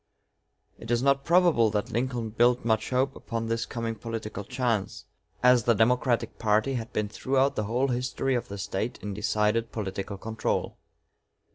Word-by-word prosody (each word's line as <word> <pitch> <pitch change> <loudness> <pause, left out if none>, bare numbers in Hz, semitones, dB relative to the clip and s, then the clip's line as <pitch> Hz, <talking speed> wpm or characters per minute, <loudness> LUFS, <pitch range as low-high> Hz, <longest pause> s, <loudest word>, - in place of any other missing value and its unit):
It 115 - -10
is 120 +1 +1
not 140 0 +3
probable 170 -9 +4
that 105 +3 -2
Lincoln 120 -1 -2
built 120 +2 +3
much 110 -2 +1
hope 130 +1 +1
upon 115 0 -4
this 115 0 -1
coming 115 -1 -3
political 110 -2 -5
chance, 120 -3 -2 0.4
as 125 -2 +5
the 115 - +4
Democratic 120 +2 +1
party 110 +4 +2
had 115 -3 -4
been 105 -1 -1
throughout 135 +5 +1
the 110 - -1
whole 125 +6 0
history 130 +2 -1
of 120 - -1
the 100 - -7
State 100 +4 -3
in 105 -1 -4
decided 105 +2 0
political 100 -1 -4
control. 110 +2 -2
115 Hz, 160 wpm, -27 LUFS, 110-125 Hz, 0.4 s, as